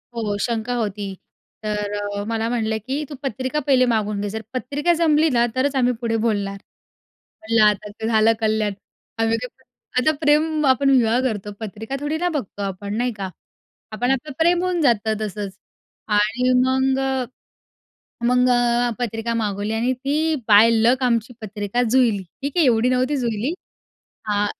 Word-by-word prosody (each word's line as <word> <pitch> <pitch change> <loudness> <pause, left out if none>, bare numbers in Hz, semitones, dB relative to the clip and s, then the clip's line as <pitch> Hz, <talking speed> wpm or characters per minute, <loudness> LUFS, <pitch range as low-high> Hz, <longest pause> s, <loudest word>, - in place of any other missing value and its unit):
हो 210 -3 -2
शंका 235 0 -2
होती. 205 -4 -3 0.5
तर 210 -1 -2
अ, 205 0 -3
मला 225 0 -1
म्हणाले, 220 -2 -1
की 270 +7 -3
"तू 290 - -7
पत्रिका 260 +3 -2
पहिले 255 -2 +5
मागून 210 -2 -1
घे. 205 - -2
जर 220 +2 -5
पत्रिका 285 +6 0
जमली 315 -1 +3
ना 235 - +4
तरच 275 +2 0
आम्ही 250 -1 +2
पुढे 230 -1 0
बोलणार." 200 -3 -1 0.8
म्हणलं 220 0 +3
आता 210 0 +1
ते 220 +2 -6
झालं 225 0 +4
कल्याण. 215 -2 0 0.5
आम्ही 225 0 +2
काय 250 +2 -5
प्रेम 260 - -31 0.4
आता 310 - +7
प्रेम 305 +1 +2
आपण 275 +1 +3
विवाह 240 -3 +4
करतो 210 -5 -2
पत्रिका 220 +4 -6
थोडी 295 +2 -2
ना 355 +1 0
बघतो 255 - -4
आपण 200 +1 -4
नाही 245 0 0
का? 195 -3 -5 0.6
आपण 245 +4 0
आपलं 270 +3 -2
प्रेम 345 +2 +3
होऊन 360 -2 0
जातं 225 -5 +2
तसंच 210 -1 -4 0.7
आणि 225 +5 +1
मग 265 +1 +1
अ, 265 -1 0 1.0
मग 250 +1 +3
अ, 245 0 +2
पत्रिका 230 0 -2
मागवली 210 -1 -2
आणि 240 +3 +1
ती 300 +5 0
बाय 215 +2 +7
लक 235 +3 +3
आमची 235 -1 0
पत्रिका 210 +2 -2
जुळली. 230 -5 +2 0.2
ठीक 280 +4 -4
आहे. 335 - +5
एवढी 240 -1 +3
नव्हती 255 +3 +1
जुळली. 235 +4 -1 0.7
हां 205 0 +1
235 Hz, 165 wpm, -22 LUFS, 215-265 Hz, 1.0 s, आता